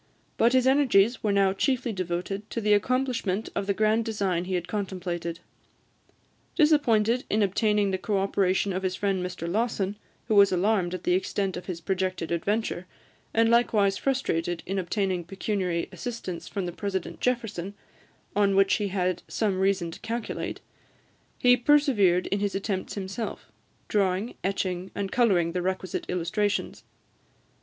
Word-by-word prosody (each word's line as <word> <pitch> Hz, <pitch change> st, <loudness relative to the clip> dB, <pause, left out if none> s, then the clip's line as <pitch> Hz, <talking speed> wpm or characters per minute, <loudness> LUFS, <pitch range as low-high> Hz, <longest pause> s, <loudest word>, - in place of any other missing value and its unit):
But 235 Hz, +2 st, +3 dB
his 255 Hz, -1 st, +4 dB
energies 255 Hz, -5 st, +4 dB
were 215 Hz, -3 st, +1 dB
now 195 Hz, -1 st, +3 dB
chiefly 245 Hz, +2 st, 0 dB
devoted 185 Hz, +3 st, -3 dB
to -, -, -3 dB
the 210 Hz, -1 st, +3 dB
accomplishment 230 Hz, -3 st, 0 dB
of 200 Hz, -, -2 dB
the 200 Hz, -, +2 dB
grand 215 Hz, +2 st, +2 dB
design 195 Hz, -6 st, -1 dB
he 185 Hz, 0 st, -2 dB
had 175 Hz, -1 st, -2 dB
contemplated. 175 Hz, -4 st, -4 dB, 1.1 s
Disappointed 250 Hz, -7 st, +3 dB
in 215 Hz, 0 st, +2 dB
obtaining 205 Hz, 0 st, +2 dB
the 190 Hz, -, -1 dB
co 205 Hz, +1 st, -1 dB
operation 195 Hz, 0 st, +1 dB
of 185 Hz, -, -2 dB
his 185 Hz, -1 st, -1 dB
friend 195 Hz, -3 st, 0 dB
Mr 180 Hz, -2 st, -5 dB
Lawson, 205 Hz, 0 st, -1 dB, 0.3 s
who -, -, +1 dB
was 200 Hz, -1 st, +6 dB
alarmed 185 Hz, -1 st, +1 dB
at 180 Hz, -, -7 dB
the 180 Hz, -, +2 dB
extent 190 Hz, +1 st, -1 dB
of 180 Hz, 0 st, -7 dB
his 180 Hz, -3 st, -4 dB
projected 185 Hz, -2 st, -2 dB
adventure, 185 Hz, +1 st, -1 dB, 0.4 s
and 225 Hz, 0 st, +3 dB
likewise 215 Hz, -4 st, +3 dB
frustrated 175 Hz, -11 st, -1 dB
in 195 Hz, +1 st, -2 dB
obtaining 185 Hz, -1 st, -1 dB
pecuniary 185 Hz, -1 st, -2 dB
assistance 230 Hz, -8 st, -6 dB
from 195 Hz, -2 st, -3 dB
the 175 Hz, -, -3 dB
President 190 Hz, 0 st, -4 dB
Jefferson, 210 Hz, -6 st, -2 dB, 0.6 s
on 200 Hz, -1 st, +3 dB
which 195 Hz, 0 st, +4 dB
he 210 Hz, -, -1 dB
had 185 Hz, -2 st, -1 dB
some 200 Hz, -4 st, -1 dB
reason 190 Hz, -3 st, +1 dB
to -, -, -10 dB
calculate, 230 Hz, 0 st, -4 dB, 0.8 s
he 245 Hz, 0 st, +5 dB
persevered 240 Hz, -, +3 dB
in 200 Hz, -, +1 dB
his 205 Hz, -1 st, -1 dB
attempts 195 Hz, -1 st, -3 dB
himself, 200 Hz, +3 st, -5 dB, 0.4 s
drawing, 195 Hz, +2 st, 0 dB
etching, 185 Hz, -1 st, -2 dB
and 195 Hz, -1 st, -3 dB
colouring 190 Hz, -9 st, +3 dB
the 180 Hz, +1 st, -2 dB
requisite 185 Hz, 0 st, -3 dB
illustrations. 205 Hz, +4 st, -1 dB
195 Hz, 150 wpm, -27 LUFS, 185-220 Hz, 1.1 s, was